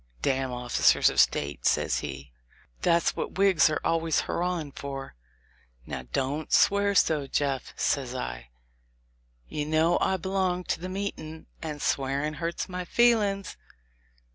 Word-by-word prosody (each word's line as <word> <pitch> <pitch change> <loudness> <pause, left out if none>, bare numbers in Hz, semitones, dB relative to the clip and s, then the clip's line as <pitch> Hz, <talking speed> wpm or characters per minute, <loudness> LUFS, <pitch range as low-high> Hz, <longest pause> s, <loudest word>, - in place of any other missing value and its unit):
"Damn 135 -1 0
officers 125 0 +3
of - - -1
State!" 70 0 +2
says - - +2
he; 70 -1 -7 0.5
"that's 170 0 +2
what - - -4
Whigs 190 -8 +5
are 150 - -1
always 165 -1 +1
hurrahing 175 -4 -2
for." 135 -1 -7 0.7
"Now, 60 - -6
don't 145 - -2
swear 200 0 +4
so, 150 -5 +3
Jeff," 135 -2 -1
says - - 0
I; - - -5 1.0
you 150 - -3
know 160 +3 +2
I 190 - +2
belong 185 0 -1
to - - -2
the 180 +2 -5
meetin', 185 -5 -5 0.2
and 150 -3 -5
swearin' 140 +3 -1
hurts 170 +1 -2
my 180 -1 -4
feel 235 +4 +4
ings." 195 -1 -3
155 Hz, 140 wpm, -27 LUFS, 135-180 Hz, 1.0 s, Whigs